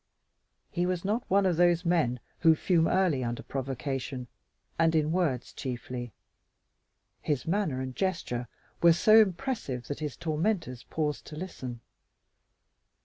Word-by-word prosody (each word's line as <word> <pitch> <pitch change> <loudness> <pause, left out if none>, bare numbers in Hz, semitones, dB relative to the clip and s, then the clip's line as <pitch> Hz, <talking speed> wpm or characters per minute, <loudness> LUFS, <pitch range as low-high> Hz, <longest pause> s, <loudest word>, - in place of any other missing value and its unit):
He 175 0 0
was 180 0 -2
not 215 +4 0
one 195 +1 +4
of 180 -3 +2
those 175 0 +4
men 160 -8 +2 0.2
who 160 -2 +6
fume 165 0 +2
early 175 -9 +2
under 120 0 -3
provocation 135 -1 -4 0.5
and 165 0 +4
in 155 0 +2
words 160 -9 0
chiefly. 120 -2 -5 1.1
His 145 -5 -1
manner 165 -7 0
and 130 -1 -5
gesture 165 -11 -2 0.3
were 170 -1 +7
so 215 +6 +6
impressive 185 - -2
that 145 - -3
his 150 -3 -4
tormentors 160 - -1
paused 150 -2 -2
to 150 - -9
listen. 130 -9 -6
160 Hz, 135 wpm, -29 LUFS, 130-180 Hz, 1.1 s, were